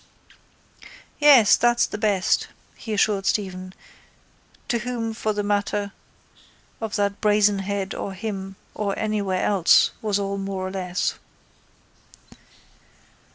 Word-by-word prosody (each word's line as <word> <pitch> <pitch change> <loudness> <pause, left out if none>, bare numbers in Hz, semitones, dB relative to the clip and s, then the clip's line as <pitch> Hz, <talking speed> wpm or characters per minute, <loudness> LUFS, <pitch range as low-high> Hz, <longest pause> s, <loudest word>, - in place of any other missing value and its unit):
—Yes, 280 -8 +7
that's 240 0 +3
the 210 - -6
best, 205 -3 +1 0.3
he 225 - -8
assured 205 -2 +1
Stephen 185 -3 -2 1.0
to 235 - 0
whom 230 -1 -3
for 220 -1 -2
the 205 0 -2
matter 205 0 -1 0.9
of 220 -2 -3
that 200 -1 -1
Brazen 210 -1 +3
Head 195 0 -3
or 195 - -5
him 195 -1 -5 0.2
or 200 -2 -2
anywhere 205 -4 -1
else 195 -5 +4
was 210 -3 0
all 200 0 -3
more 195 -1 -4
or - - -6
less. 180 -2 -2
205 Hz, 115 wpm, -23 LUFS, 195-215 Hz, 1.0 s, Yes